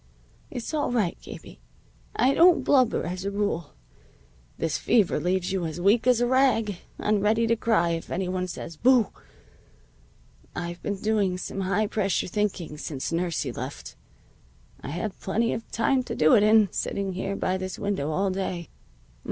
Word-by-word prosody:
"It's 245 +5 -6
all 295 -4 0
right, 215 -8 +1
Gabie. - - -11 0.6
I 255 +4 +3
don't 345 +2 +5
blubber 255 -5 +3
as 180 +1 -4
a 200 - -1
rule. 200 - -2 0.8
This 165 -2 -1
fever 210 -6 +2
leaves 180 +1 0
you 190 -2 -1
as 160 +2 -6
weak 205 +7 +3
as 250 -2 +5
a 245 - +2
rag, 240 -6 +2 0.2
and 210 -1 +1
ready 220 +3 +2
to 230 0 +2
cry 220 -7 +2
if 165 0 -4
any 185 +1 -2
one 185 0 -2
says 170 -2 -7
'Boo!' 250 -4 +4 1.4
I've 175 0 -5
been 205 - -2
doing 205 -4 +1
some 195 +2 -5
high 195 +3 +1
pressure 200 -2 0
thinking 180 -6 -2
since 140 -1 -4
nursie 170 -1 -2
left. - - -7 0.9
Had 175 +7 -4
plenty 230 +4 0
of 225 - -6
time 255 +3 +1
to - - -4
do 155 0 +4
it - - +6
in, 215 -1 +5
sitting 195 -1 -2
here 190 +2 -3
by 185 -1 -1
this 185 0 -5
window 200 -8 -2
all 190 +5 0
day. 185 -3 -4
195 Hz, 165 wpm, -26 LUFS, 180-225 Hz, 1.4 s, it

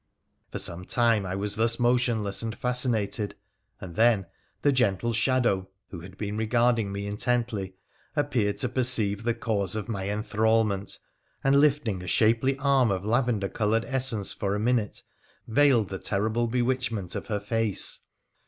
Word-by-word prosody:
For - - -4
some 85 +2 -2
time 115 -4 +2
I 90 - -3
was 100 +1 -2
thus 115 +1 +2
motionless 120 -5 +1
and 115 -1 -4
fascinated, 115 -5 -1 0.4
and 85 -3 -9
then 110 -3 +3 0.4
the 145 - +4
gentle 120 -3 +1
shadow, 115 -5 +1 0.2
who 90 - -7
had 95 +3 -12
been 105 0 -4
regarding 115 -1 +1
me 100 0 -4
intently, 105 -2 -2 0.4
appeared 125 -9 0
to 125 - 0
perceive 120 -5 +1
the 115 0 -1
cause 100 -4 -1
of 110 0 -4
my 100 -4 -3
enthralment, 105 -1 0 0.5
and 140 +1 +4
lifting 135 -10 +1
a 90 - -8
shapely 115 +6 +2
arm 135 -3 +3
of 95 0 -2
lavender 115 -3 +1
coloured 110 +3 0
essence 130 -7 -2
for 100 0 -2
a - - -2
minute 115 -2 0 0.4
veiled 125 -4 +3
the 95 - -5
terrible 110 +4 0
bewitchment 120 -5 -1
of - - -5
her 105 -2 -1
face. 110 0 +2
110 Hz, 155 wpm, -27 LUFS, 100-125 Hz, 0.5 s, the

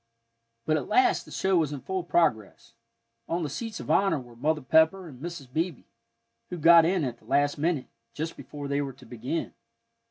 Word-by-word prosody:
But 155 +1 +2
at - - -4
last 375 -1 +3
the - - -14
show 190 -1 +1
was 155 -4 +1
in 145 -3 -5
full 190 +4 -3
progress; 115 - 0 0.6
on 170 +1 -1
the 150 - -3
seats 225 +6 -5
of - - -4
honor 190 -1 +3
were 120 -2 -13
Mother 150 +5 0
Pepper 160 +7 +3
and 130 -5 -12
Mrs. 160 -6 -7
Beebe, 165 -2 -2 0.7
who 180 - -5
got 165 +1 +7
in 180 -1 +1
at 120 -3 -4
the - - -24
last 145 +1 +1
minute, 155 -3 0 0.3
just 160 +2 -4
before 145 -1 -8
they 140 +1 0
were 135 -2 -4
to 130 0 -17
begin. 125 +7 -4
155 Hz, 195 wpm, -27 LUFS, 135-170 Hz, 0.7 s, got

